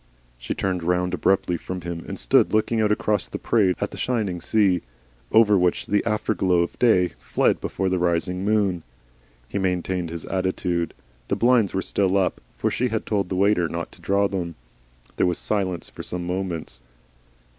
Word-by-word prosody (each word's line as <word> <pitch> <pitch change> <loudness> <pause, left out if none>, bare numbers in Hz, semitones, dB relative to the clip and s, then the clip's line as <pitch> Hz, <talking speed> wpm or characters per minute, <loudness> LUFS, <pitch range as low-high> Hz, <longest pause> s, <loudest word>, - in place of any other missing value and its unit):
She - - -4
turned 95 -2 -1
round 90 +1 0
abruptly 90 0 +1
from 90 +2 -6
him 85 -1 -5
and - - -5
stood - - +3
looking 110 +1 +2
out 105 -1 +2
across 105 -1 0
the - - -5
parade 100 -6 +2
at - - -2
the - - -9
shining 105 -8 -1
sea 95 -3 +2 0.5
over 105 -3 +5
which 90 -1 +1
the 105 0 +1
afterglow 95 -4 +1
of 85 - -7
day 95 -7 +4
fled - - +1
before 95 - -2
the 95 -1 +1
rising 90 +1 0
moon. 100 -4 +1 0.7
He 100 - -3
maintained 90 -2 -1
his 85 0 -6
attitude. 90 -2 -1 0.3
The - - 0
blinds 120 -5 +3
were 95 - 0
still 100 -1 +1
up, 95 -2 0 0.2
for - - 0
she 125 - 0
had 110 -2 -2
told 100 -4 -1
the 95 - -2
waiter 95 -3 +2
not 85 0 -4
to - - -17
draw 100 +1 +2
them. 90 -4 -4 0.6
There - - +3
was 90 - 0
silence 95 -5 -1
for - - -9
some 90 -1 -3
moments. 90 -8 -4
95 Hz, 180 wpm, -24 LUFS, 90-100 Hz, 0.7 s, over